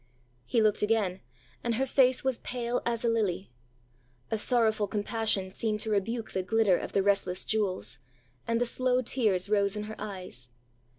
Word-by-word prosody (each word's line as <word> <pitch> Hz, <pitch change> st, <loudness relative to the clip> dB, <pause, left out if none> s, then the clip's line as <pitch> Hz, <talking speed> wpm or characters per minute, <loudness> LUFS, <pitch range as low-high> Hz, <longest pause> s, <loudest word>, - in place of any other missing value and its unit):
ã -, -, -36 dB, 0.4 s
He 230 Hz, -, +2 dB
looked 215 Hz, -1 st, +2 dB
again, 210 Hz, -4 st, +1 dB, 0.4 s
and 235 Hz, -1 st, 0 dB
her 265 Hz, +4 st, +1 dB
face 260 Hz, -1 st, +3 dB
was 265 Hz, -2 st, 0 dB
pale 245 Hz, 0 st, -2 dB
as 235 Hz, -1 st, -1 dB
a -, -, +3 dB
lily. 205 Hz, -, 0 dB, 0.8 s
A 220 Hz, -, +1 dB
sorrowful 220 Hz, -3 st, +2 dB
compassion 205 Hz, -2 st, 0 dB
seemed 215 Hz, +1 st, -1 dB
to 220 Hz, -, -2 dB
rebuke 220 Hz, +3 st, -1 dB
the 190 Hz, -, -1 dB
glitter 210 Hz, 0 st, +3 dB
of -, -, -6 dB
the 195 Hz, -, +2 dB
restless 195 Hz, -2 st, +1 dB
jewels, 185 Hz, -, -1 dB, 0.5 s
and 230 Hz, 0 st, +1 dB
the 245 Hz, -, +2 dB
slow 255 Hz, +1 st, +1 dB
tears 210 Hz, -7 st, +1 dB
rose 200 Hz, -1 st, +2 dB
in 210 Hz, -, -3 dB
her 215 Hz, +1 st, -7 dB
eyes. 185 Hz, -, -7 dB
215 Hz, 175 wpm, -29 LUFS, 195-235 Hz, 0.8 s, face